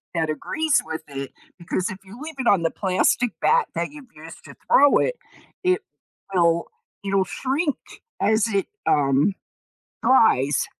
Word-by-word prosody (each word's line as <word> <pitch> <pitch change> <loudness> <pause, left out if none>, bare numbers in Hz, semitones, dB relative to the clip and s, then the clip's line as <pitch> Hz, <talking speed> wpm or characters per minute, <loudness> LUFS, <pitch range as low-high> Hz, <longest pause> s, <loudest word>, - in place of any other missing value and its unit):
that 160 -1 0
agrees 305 - 0
with 160 0 -5
it 140 -1 -6 0.3
because 180 +3 -2
if 190 - -6
you 195 +5 -13
leave 315 0 -7
it 255 - -1
on 190 -4 +4
the 165 - +1
plastic 195 +5 +1
bat 475 -3 +3
that 170 +7 -2
you've 295 -2 -12
used 160 +2 -12
to - - -12 0.2
throw 285 0 +6
it - - 0 0.5
it 365 0 +2 0.5
will 170 -2 +2 0.4
it'll 195 -1 +2
shrink 275 - -2 0.4
as 220 0 +3
it, 200 -2 0 0.2
um, 140 +5 +2 0.7
dries 145 - +3
195 Hz, 150 wpm, -23 LUFS, 165-270 Hz, 0.7 s, throw